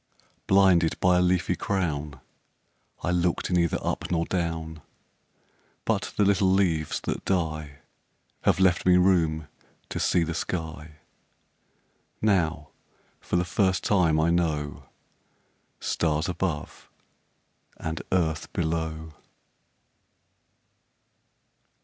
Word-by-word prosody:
Blinded 95 -4 +4
by 90 -1 +4
a - - +3
leafy 90 0 +1
crown 75 -7 -2 0.8
I 90 - 0
looked 90 0 0
neither 85 -2 +2
up - - -2
nor 85 -1 0
down 80 -3 -3 1.0
But - - -1
the 105 - +4
little 95 -1 +3
leaves 85 -6 +1
that - - -3
die 80 -6 -2 0.6
Have - - +2
left 95 -2 +3
me 90 0 +5
room 80 -5 +2 0.4
to - - -4
see 85 - +2
the 85 0 -3
sky; 80 -2 -5 1.2
Now 80 -7 +1 0.5
for - - -3
the 90 0 +2
first 95 0 +1
time 85 -6 +3
I 80 +2 +3
know 75 -4 -1 0.9
Stars 80 +1 0
above 85 -4 -4 0.9
and 80 0 -4
earth 80 -4 0
below. 80 -1 -2
85 Hz, 100 wpm, -26 LUFS, 80-90 Hz, 1.2 s, me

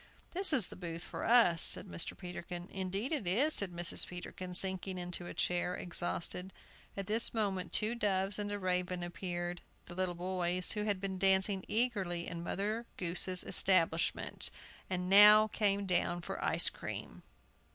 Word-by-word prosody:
"This 375 +1 0
is 260 -10 +4
the - - -11
booth 170 -2 -6
for - - -7
us," 225 -8 +4
said - - +5
Mr. 180 -3 -4
Peterkin. 175 -1 -8
"Indeed 195 - -3
it 285 - -2
is," 265 - +3
said 200 -3 -1
Mrs. 175 0 +1
Peterkin, 180 0 -8
sinking 190 0 +3
into 175 0 -5
a - - -7
chair, 180 0 -1
exhausted. 175 +1 -4 0.5
At 195 - -4
this 220 +4 +4
moment 195 -4 -2
two 215 +2 +1
doves 200 -3 0
and 205 0 -3
a 205 - -3
raven 180 -2 -2
appeared, 175 0 -5 0.2
the - - -11
little 185 -1 -2
boys, 180 0 -1
who 210 -1 -3
had 205 -3 -1
been 190 -1 -4
dancing 190 0 +3
eagerly 195 -8 0
in 170 -1 -5
Mother 215 +6 -3
Goose's 180 +1 0
establishment, 170 -3 +1 0.4
and 180 -1 -3
now 210 +2 +8
came 200 -1 0
down 175 -1 0
for - - -6
ice - - +3
cream. - - -8
185 Hz, 160 wpm, -33 LUFS, 175-205 Hz, 0.5 s, now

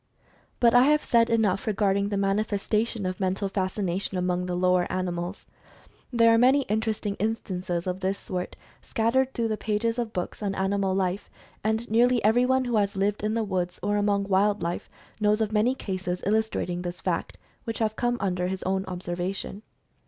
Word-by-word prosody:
But 235 -2 +5
I 245 +1 +7
have 300 +1 +3
said 230 -1 +3
enough 220 -1 +1
regarding 200 -1 +1
the 205 - -1
manifestation 210 +2 0
of 185 0 -3
Mental 190 +1 0
Fascination 190 -1 -1
among 180 0 0
the 180 - -2
lower 180 0 +2
animals. 180 0 -3 0.7
There 230 -2 +5
are 230 - +4
many 265 +3 +5
interesting 215 -2 -1
instances 185 -5 -2
of 185 0 -2
this 190 +1 -1
sort, 180 -1 -5 0.3
scattered 255 +4 +1
through 230 -1 0
the 215 - -1
pages 225 +3 -1
of 235 -2 -2
books 180 +2 -4
on 200 -2 -2
animal 195 0 0
life, 190 0 -1 0.3
and 220 +2 0
nearly 245 +2 +4
everyone 250 +4 +3
who 240 -2 +1
has 205 -1 +1
lived 200 +2 0
in 215 +1 0
the 230 - +1
woods, 180 -3 -2
or 205 +1 +1
among 205 -1 +1
wild 200 +1 +2
life 170 +1 -3 0.3
knows 210 0 +3
of 220 -1 0
many 220 +4 +2
cases 185 -6 -4
illustrating 205 -4 0
this 175 0 -5
fact - - -2 0.3
which 225 -1 -3
have 220 -1 0
come 240 +1 0
under 180 -2 -1
his 190 0 -4
own 190 +1 0
observation. 180 +2 -4
200 Hz, 175 wpm, -26 LUFS, 185-225 Hz, 0.7 s, I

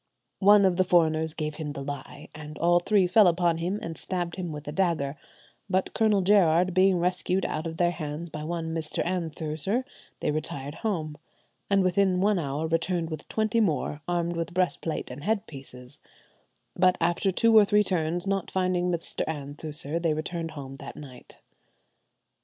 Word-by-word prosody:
"One 205 0 +6
of 180 -2 +2
the 185 - +4
foreigners 160 -3 +2
gave 150 -1 -3
him 150 -2 -4
the 140 - -6
lie, 145 +1 -7
and 150 0 -9
all 175 +1 +4
three 195 +1 +3
fell 190 +3 +5
upon 170 -1 +2
him, 180 +5 -1
and 165 -1 -5
stabbed 175 -1 -3
him 180 -3 -4
with 150 -1 -8
a - - -3
dagger; 155 -5 0 0.5
but 185 0 0
Colonel 215 -3 +3
Gerard 180 -2 +4
being 185 0 +4
rescued 180 +1 0
out 155 +2 -3
of 160 0 -6
their 175 -1 +3
hands 160 0 -6
by 150 - -6
one 165 0 -3
Mr. 160 -2 -2
Anthuser, 170 - -2 0.4
they - - 0
retired 145 -2 -4
home, 155 -9 -2 0.5
and 195 -1 +3
within 185 0 +2
one 200 0 +2
hour 145 0 -2
returned 165 +1 0
with 155 -1 -6
twenty 220 +1 0
more, 150 - 0
armed 175 -1 -1
with 170 +1 -4
breastplate 180 -6 -1
and 135 +3 -8
head 215 +1 0
pieces; 130 - -11 0.8
but 185 0 +3
after 175 +3 +1
two 225 +4 +3
or 215 - +9
three 210 +1 +3
turns, 175 -1 -1
not 195 -2 -1
finding 185 -1 0
Mr. 170 -1 -1
Anthuser, 150 +1 -4
they 165 -2 +1
returned 165 +1 -4
home 135 -1 -7
that - - -9
night." 130 -4 -11
170 Hz, 175 wpm, -27 LUFS, 155-185 Hz, 0.8 s, or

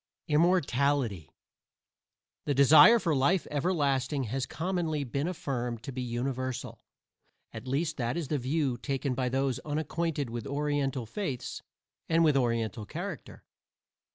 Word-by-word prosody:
IMMORTALITY 140 - +1 1.2
The 145 - +1
desire 155 - +8
for 170 -8 0
life 150 +7 +2
everlasting 145 -3 0
has 130 +2 -3
commonly 165 -3 -2
been 140 +4 -2
affirmed 125 -9 -3
to 135 - -5
be 130 0 -4
universal 125 +1 -3 0.7
at 115 +2 -8
least 145 +5 -1
that 120 +3 -1
is 165 -5 -3
the 150 - 0
view 130 -1 -1
taken 135 0 -2
by 125 0 -1
those 135 0 0
unacquainted 155 -2 -2
with 120 +3 -5
Oriental 140 -3 -1
faiths 135 - -4 0.5
and 165 0 +4
with 150 -3 +4
Oriental 115 -4 0
character. - - -7
140 Hz, 125 wpm, -29 LUFS, 125-155 Hz, 1.2 s, desire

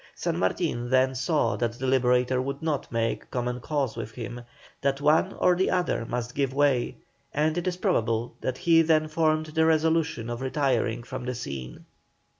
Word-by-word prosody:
San - - -2
Martin 120 - -1
then 130 0 +3
saw 130 -2 +1
that 120 -1 -1
the 125 +3 -5
Liberator 125 0 +2
would 140 +3 -4
not 155 -4 -2
make 115 -1 -1
common 125 0 -2
cause 140 -2 -2
with 115 -1 -5
him, 120 +1 -6 0.4
that 140 0 0
one 155 +6 +3
or 180 - +3
the 190 +2 +1
other 175 -10 0
must 120 0 -3
give 135 -2 -1
way, 140 -4 +2 0.4
and 155 +1 +2
it 175 +1 -2
is 180 -1 -1
probable 115 -6 0
that 130 0 -2
he 165 -1 +5
then 155 -1 +3
formed 155 0 +1
the 160 0 +3
resolution 160 -5 +2
of 120 +1 -4
retiring 130 -4 0
from 125 +2 -6
the 125 0 -3
scene. 65 - -7
130 Hz, 180 wpm, -26 LUFS, 120-155 Hz, 0.4 s, he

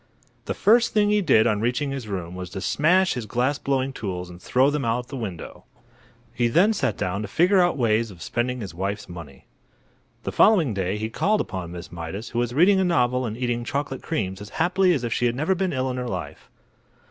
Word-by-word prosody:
The - - -3
first 235 +2 +3
thing 210 -1 +3
he 210 0 +3
did 130 - +4
on 105 -1 +1
reaching 125 +5 0
his 135 -5 -5
room 90 -4 -5
was 90 -1 -6
to 95 +1 -6
smash 180 - +3
his 120 -4 -5
glass 130 +6 0
blowing 135 -1 -1
tools 90 -6 -5
and 85 0 -13
throw 130 +7 +2
them 145 -1 -1
out 115 0 +1
of 120 - -17
the 140 - -6
window. 100 -9 -7 0.7
He 120 0 +1
then 180 - +4
sat - - -1
down 95 +3 -2
to 105 - -4
figure 180 - +3
out 175 -3 +3
ways 115 -2 +1
of 90 -4 -13
spending 125 +1 -2
his 100 -5 -6
wife's 100 +4 -4
money. 85 -6 -11 0.8
The - - -3
following 175 - +4
day 95 0 -1
he 110 +1 -4
called 210 - +1
upon 90 -3 -4
Miss 85 0 -9
Mydas, 85 +6 -6
who 120 - -2
was 120 0 0
reading 180 +9 +4
a - - +3
novel 125 -7 +1
and 110 0 -5
eating 120 -1 -1
chocolate 140 +1 -3
creams 95 - -3
as 105 - -8
happily 180 +2 +3
as 130 - -3
if 115 -2 -1
she 120 - +1
had 120 - -1
never 155 +8 +1
been 190 0 -1
ill 130 -1 -1
in 125 - -4
her 125 0 -3
life. - - -6
120 Hz, 230 wpm, -24 LUFS, 100-150 Hz, 0.8 s, did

